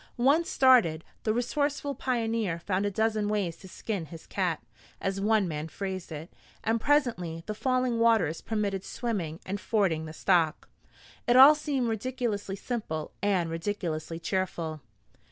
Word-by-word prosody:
Once 280 +7 +3
started, 230 -12 +5 0.2
the 215 - 0
resourceful 285 +4 -1
pioneer 225 -9 -1
found 185 +3 -1
a - - +1
dozen 215 +1 0
ways 200 -6 -1
to 190 - -13
skin 185 -2 -4
his 165 +2 -11
cat, 180 -5 -1 0.4
as 195 0 -2
one 210 -1 +3
man 155 -1 -4
phrased 190 0 -5
it, 160 +3 -7 0.3
and 225 0 +1
presently 220 - +1
the 215 - -3
falling 255 +1 0
waters 220 -9 +3
permitted 205 -3 -2
swimming 185 -11 -3
and 200 +1 -4
fording 185 -8 +1
the - - -7
stock. 170 -2 +1 0.6
It 240 - +4
all 270 +4 +10
seemed 290 -5 -1
ridiculously 225 -3 -2
simple 200 -8 -4
and 185 -5 +1
ridiculously 165 -2 -3
cheerful. 170 -4 -2
205 Hz, 145 wpm, -28 LUFS, 170-235 Hz, 0.6 s, all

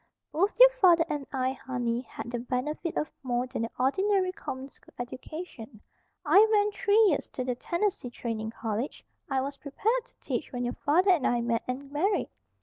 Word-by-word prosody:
"Both 385 +9 0
your - - +10
father 355 -9 +5
and 290 -3 -3
I, 260 -1 0
honey, 245 -3 -2
had 240 -1 -8
the 240 - -2
benefit 265 +7 -3
of 305 - -1
more 245 -2 0
than 255 - -4
the 230 - -2
ordinary 375 +8 +2
common 265 -7 -6
school - - -22
education. 245 - -7 0.5
I 355 +8 +7
went 415 -1 +3
three 405 +1 +2
years 305 -7 +1
to 255 - -2
the 250 0 -1
Tennessee 345 +2 -2
Training 225 -2 -4
College; 225 +3 -4 0.2
I 265 -1 +1
was 280 +1 -4
prepared 440 - -1
to - - -27
teach - - -3
when 245 -1 -3
your 245 - -1
father 360 +7 +3
and 340 -7 +3
I 240 -1 +1
met 235 -1 0
and 270 +2 -5
married. 375 +7 +1
275 Hz, 185 wpm, -28 LUFS, 245-365 Hz, 0.5 s, your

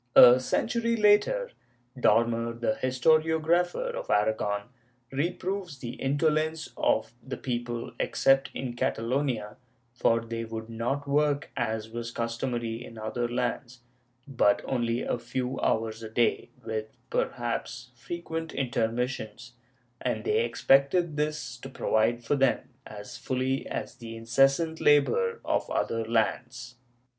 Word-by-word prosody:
A 125 0 +10
century 230 - 0
later. 230 - +3 0.4
Dormer, 115 -2 +2
the 115 -2 0
historiographer 160 - +2
of - - -6
Aragon, 105 -1 +1 0.5
reproves 175 +3 -2
the 120 -2 -6
indo 140 +5 0
lence 155 +1 -1
of 110 +1 +1
the 135 - -6
people, 120 -2 -3
except 135 0 +3
in 125 -2 -4
Catalonia, 120 -3 -1 0.4
for 115 -1 +2
they 115 0 -4
would 110 0 -6
not 130 +5 -2
work 145 0 +1
as 110 -4 -2
was 115 0 -4
customary 115 0 -3
in 115 - -11
other 115 +2 -2
lands, 125 +1 -3 0.5
but 120 -7 +2
only 120 -2 0
a - - -1
few 125 +2 -3
hours 110 0 0
a 110 - -6
day, 115 +2 +1 0.2
with 110 -1 -3 0.2
perhaps 120 +1 -2
frequent 165 +5 -5
intermissions, 120 -1 -2 0.5
and - - -1
they 435 +2 +2
expected 150 - +3
this 150 -4 -2
to 135 +2 -9
provide 120 -1 +1
for 120 - +1
them 135 -1 +2 0.2
as 105 -1 -9
fully 130 +1 -1
as - - -5
the 115 -1 -8
incessant 135 +8 +2
labor 455 - +3
of - - 0
other 115 0 0
lands. 115 +2 -1
125 Hz, 125 wpm, -28 LUFS, 115-145 Hz, 0.5 s, A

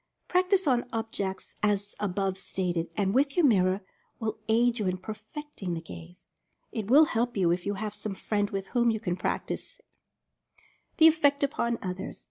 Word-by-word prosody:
Practice 370 +1 +2
on 250 -3 +2
objects 220 -5 -4
as 205 -1 +1
above 195 -1 -1
stated, 175 -4 -2
and 195 -1 +1
with 275 +4 +2
your 350 - +5
mirror, 190 -5 +3 0.4
will 220 -1 -3
aid 235 +2 +3
you 205 - 0
in 185 0 0
perfecting 215 - -6
the - - -3
gaze. 85 - -12 0.4
It 215 -3 -4
will 295 +5 +8
help 240 -5 -1
you 175 -3 +3
if 175 +2 -1
you 205 - 0
have 210 +1 -4
some 210 -1 -5
friend 205 +1 -1
with 195 -1 -4
whom 240 -1 +3
you 220 -1 0
can 180 -5 -2
practice 185 - -3
it. - - -30 1.1
THE 320 - +7
EFFECT 290 -3 +5
UPON 235 -4 0
OTHERS. 185 0 -5
210 Hz, 175 wpm, -28 LUFS, 190-245 Hz, 1.1 s, will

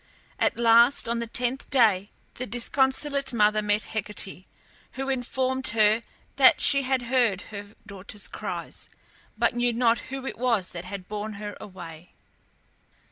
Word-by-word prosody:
At - - +1
last, 235 +3 +5
on 235 0 -1
the 235 - -3
tenth 245 +3 -1
day, 210 -6 +3 0.2
the 255 - -6
disconsolate 265 +3 0
mother 215 -1 +3
met 210 0 +1
Hecate, 200 -3 -3 0.5
who 270 +1 -4
informed 260 0 -1
her 215 0 +3 0.4
that 265 -2 +7
she 275 -1 +4
had 260 -1 0
heard 240 -6 +2
her 205 +1 -8
daughter's 200 0 -7
cries, - - -6 0.5
but - - +2
knew 240 0 +1
not 230 0 +3
who 270 0 -5
it 265 - -6
was 230 -7 +1
that 175 0 -7
had 185 -1 -7
borne 210 +1 -4
her 205 0 -7
away. 170 -4 -11
230 Hz, 145 wpm, -26 LUFS, 205-255 Hz, 0.5 s, that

